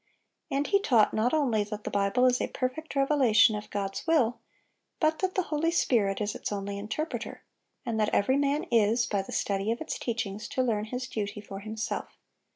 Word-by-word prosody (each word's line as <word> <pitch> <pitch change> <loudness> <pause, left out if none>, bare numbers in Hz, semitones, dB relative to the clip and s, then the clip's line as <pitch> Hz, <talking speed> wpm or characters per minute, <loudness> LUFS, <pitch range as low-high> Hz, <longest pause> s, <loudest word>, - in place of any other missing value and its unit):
And 280 0 0
he 400 - +3
taught 235 - +4
not 225 +3 +2
only 255 -9 +2
that 210 0 -7
the - - -4
Bible 200 +5 +2
is 250 -1 +3
a - - 0
perfect 275 +5 -4
revelation 260 -6 +4
of 210 0 -6
God's 195 +4 -4
will, 260 -8 +2 0.6
but 315 0 +2
that 375 -1 -1
the 370 - +2
Holy 310 +2 +2
Spirit 220 - +2
is 205 -1 -1
its - - -5
only 200 0 -3
interpreter, 225 +10 -4 0.4
and 225 -2 -1
that 215 0 +2
every 260 +6 +2
man 285 +2 +1
is, 230 +1 +3
by 200 -3 0
the 195 - -10
study 200 +2 0
of 235 - -2
its 320 - -4
teachings, 215 -3 -3
to 255 - 0
learn 215 -4 0
his 250 +3 -4
duty 210 -4 -4
for 200 -1 -8
himself. 220 +1 -5
225 Hz, 195 wpm, -28 LUFS, 210-275 Hz, 0.6 s, taught